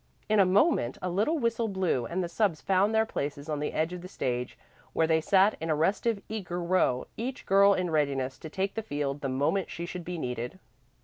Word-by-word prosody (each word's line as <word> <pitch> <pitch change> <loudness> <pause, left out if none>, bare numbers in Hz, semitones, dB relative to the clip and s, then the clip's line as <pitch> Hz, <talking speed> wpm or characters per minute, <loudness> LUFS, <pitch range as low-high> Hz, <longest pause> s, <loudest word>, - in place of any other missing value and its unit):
In 215 -1 +3
a 190 - +6
moment 190 - +3
a 180 - -3
little 215 - +1
whistle 230 -3 0
blew 185 - 0
and 180 +2 -2
the - - -2
subs 175 -2 0
found 195 +3 +2
their 220 0 +4
places 145 -7 -4
on 150 -2 -2
the 150 - -2
edge 160 +3 -1
of 180 - -6
the 180 - -8
stage, 125 -8 -3 0.4
where 160 - +3
they 160 0 +2
sat 195 +5 +4
in 165 - -3
a 155 - +3
restive, 200 +6 0
eager 190 -5 -4
row, 170 -8 +1
each 255 +4 -4
girl 200 +1 +5
in 180 -2 -1
readiness 140 -4 0
to 160 - -8
take 195 +4 -2
the 225 - -2
field 145 -7 -3
the 135 - -2
moment 145 +8 0
she 170 - -5
should 180 0 -6
be 180 +1 -5
needed. 125 +1 -4
180 Hz, 225 wpm, -28 LUFS, 150-200 Hz, 0.4 s, a